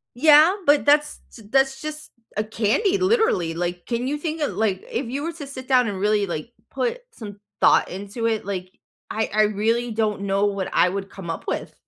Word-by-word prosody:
Yeah. 305 +6 +6
But, 290 0 +4
that's 295 +1 +3
t 225 - -13
that's 270 +1 +2
just 305 0 -7 0.3
a 210 - +1
candy, 220 - +1
literally, 375 - +2
like, 175 +1 -4
can 240 +1 -2
you 290 +2 -1
think 315 +1 -4
of 295 - 0
like, 205 -4 -1
if 255 - -2
you 275 +4 -4
were 335 +1 -3
to 295 -4 -8
sit 260 -2 -9
down 255 -3 +4
and 200 -3 -4
really, 205 0 +2
like, 170 +4 -5 0.2
put 485 0 -2
some 205 - -10 0.2
thought - - +5
into 200 +5 -5
it, 220 -2 -1
like, 185 -2 -5 0.4
I 220 0 -1
I 215 - +4
really 225 +3 0
don't 215 -2 -1
know 200 0 +1
what 200 -2 -2
I 180 - +4
would 195 +1 -4
come 185 -4 -9
up 165 - -5
with. - - -3
225 Hz, 205 wpm, -23 LUFS, 200-290 Hz, 0.4 s, Yeah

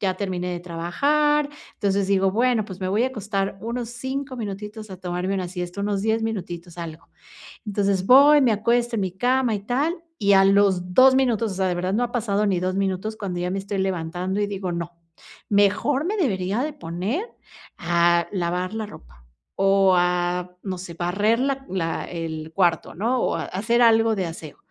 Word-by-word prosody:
ya 185 -2 -1
terminé 180 -3 -2
de 175 - -4
trabajar, 285 - +1 0.3
entonces 200 -2 0
digo: 195 -1 +3
"Bueno, 235 +1 +2
pues 190 -3 -9
me 185 -1 -3
voy 210 +5 +2
a - - +2
acostar 205 -6 -3
unos 235 +1 -3
5 260 +3 -5
minutitos 210 0 -6
a 185 - -8
tomarme 180 +1 -3
una 185 -2 -2
siesta, 180 +1 -5
unos 200 -1 -1
10 220 +1 +1
minutitos, 175 -6 -5
algo", 165 -2 -8 0.6
entonces, 200 -2 0
voy, 285 +5 +7
me 250 -4 +4
acuesto 235 +3 +1
en 215 - 0
mi 190 -2 -1
cama 245 +4 +1
y 205 - -1
tal, 280 +9 0 0.2
y 200 -7 +3
a 195 0 +6
los 195 -2 +3
2 260 +5 +7
minutos, 235 -5 +1
o - - -6
sea, 190 0 0
de 180 - 0
verdad 180 +2 -1
no 235 +4 +1
ha 240 - -3
pasado 210 -4 0
ni 190 -3 +1
2 185 +1 -1
minutos 195 +2 -1
cuando 190 -5 -4
ya 180 0 -1
me 195 - -2
estoy 200 +1 -4
levantando 185 +1 -2
y 205 - +1
digo: 195 -3 -4
"No, 170 0 -4 0.6
mejor 205 +8 +2
me 415 +5 -1
debería 200 - 0
de 305 0 -3
poner 200 - -3 0.5
a 170 -1 +2
lavar 180 0 -2
la 220 -1 -3
ropa - - -15 0.3
o 195 0 +4
a, 180 0 0
no 190 -2 -4
sé, 175 -2 -8
barrer 205 +7 +1
la 270 +1 -1
la 165 -3 -2
el 160 -2 -6
cuarto," 175 -3 +1
¿no? 235 +8 0
O - - 0
hacer 230 +6 0
algo 225 -1 +4
de 190 -3 -1
aseo, 165 -3 -8
195 Hz, 190 wpm, -23 LUFS, 180-225 Hz, 0.6 s, voy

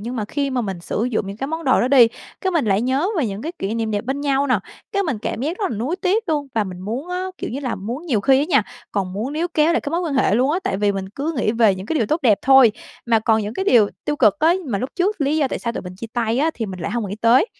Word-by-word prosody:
nhưng 240 +4 -5
mà 215 - -2
khi 280 +5 -2
mà 255 -1 0
mình 195 -6 -4
sử 210 +5 -2
dụng 230 -5 -1
những 195 +1 -6
cái 265 - -3
món 320 +3 -4
đồ 260 - +4
đó 245 - +1
đi, 255 -4 +7 0.3
cái 380 - 0
mình 330 -7 +1
lại 200 -2 +2
nhớ 265 +8 +1
về 270 - +1
những 200 0 -5
cái 325 +4 -4
kỷ 200 +3 -2
niệm 225 -1 -1
đẹp 205 0 -2
bên 265 +3 -2
nhau 280 -1 +1
nè, 250 -5 +2 0.3
cái 400 -1 +1
mình 285 - -2
cảm 220 - -4
giác 315 +8 -2
rất 410 - -1
là 225 - -3
nuối 260 - -2
tiếc 385 +2 0
luôn. 295 -3 0
Và 220 -2 +1
mình 180 -2 -8
muốn 235 - -4
á, 360 +1 -2
kiểu - - -4
như 265 +4 -4
là, 255 -4 -2
muốn 240 - -6
nhiều 235 -9 +1
khi 265 +6 +4
á 285 - +2
nha, 280 - +4 0.3
còn 190 -2 -2
muốn 225 +8 -3
níu 330 +3 -1
kéo 310 +2 +4
lại 340 - +1
cái 285 - -5
mối 335 +2 0
quan 330 -5 -2
hệ 260 -7 +3
luôn 255 +5 +2
á, 335 - +1
tại - - 0
vì 205 0 +1
mình 195 -1 -4
cứ 280 +10 -3
nghĩ 215 -3 +1
về 225 -4 +4
những 190 +1 -8
cái 325 - -2
điều 230 -9 +1
tốt 310 +2 0
đẹp 215 -6 +4
thôi, 265 -4 +7 0.3
mà 230 -1 +4
còn 220 0 +2
những 210 +2 -5
cái 385 - -2
điều 235 - +5 0.2
tiêu 295 - -1
cực 215 -8 +4
á, 325 +3 +4
mà 220 -7 -1
lúc 255 +6 -3
trước 375 +1 0
lý 285 +2 +1
do 290 -4 +2
tại - - -3
sao 235 - -3
tụi - - -5
mình 180 0 -8
chia 230 - -6
tay 235 -1 0
á, 310 +4 +2
thì 225 - -3
mình 185 -2 -7
lại 185 - -3
hông 225 -2 -2
nghĩ 200 - -5
tới. 235 - +5
250 Hz, 325 wpm, -21 LUFS, 215-300 Hz, 0.3 s, đi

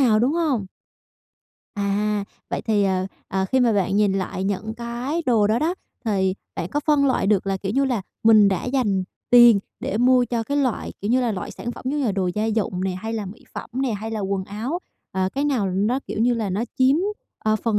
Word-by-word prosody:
nào, 230 -5 +4
đúng 245 +6 +2
hông? 300 - 0 1.1
À, 205 0 0 0.3
vậy - - -2
thì, 210 -2 +2
ờ, 185 -1 +1 0.2
ờ, 190 0 0
khi 260 +7 +1
mà 240 -2 +4
bạn 195 -1 +1
nhìn 205 -2 +3
lại 190 -1 -2
những 205 +3 -2
cái 240 +7 -3
đồ 225 -5 +4
đó 215 +3 +2
đó, 325 +6 0 0.3
thì 190 -4 +1 0.2
bạn 170 - -3
có 290 - -1
phân 295 -2 +4
loại 260 -6 +1
được 200 -1 +2
là, 195 0 0
kiểu 195 +1 -4
như 275 +4 +2
là, 245 -7 0 0.2
mình 215 -2 +7
đã 190 -2 -1
dành 235 -8 +1 0.3
tiền 240 -3 +8 0.2
để 205 - -2
mua 250 +1 +5
cho 235 -1 -2
cái 280 +6 -2
loại, 260 -6 0
kiểu 205 - -2
như 255 +2 +4
là, 240 -3 0
loại 185 - -5
sản 240 - -5
phẩm - - -11
giống 295 +2 -1
như - - 0
là 210 - +1
đồ 190 -2 0
gia 210 - 0
dụng 215 -4 -1
nè, 190 - 0
hay 195 +5 -5
là 215 -3 -3
mỹ 195 +5 -11
phẩm - - -6
nè, 260 -4 0
hay 215 +2 -4
là 220 -1 -3
quần 195 -1 -1
áo, 225 - -3 0.3
à, 190 0 0
cái 280 +2 0
nào 255 -9 +1
nó, 205 +7 +1
kiểu - - -4
như 240 +1 +3
là, 220 -4 -2
nó 200 +5 -1 0.2
chiếm, 260 +2 +5 0.4
ờ, 215 0 +1
phần 215 0 0
220 Hz, 235 wpm, -23 LUFS, 195-245 Hz, 1.1 s, tiền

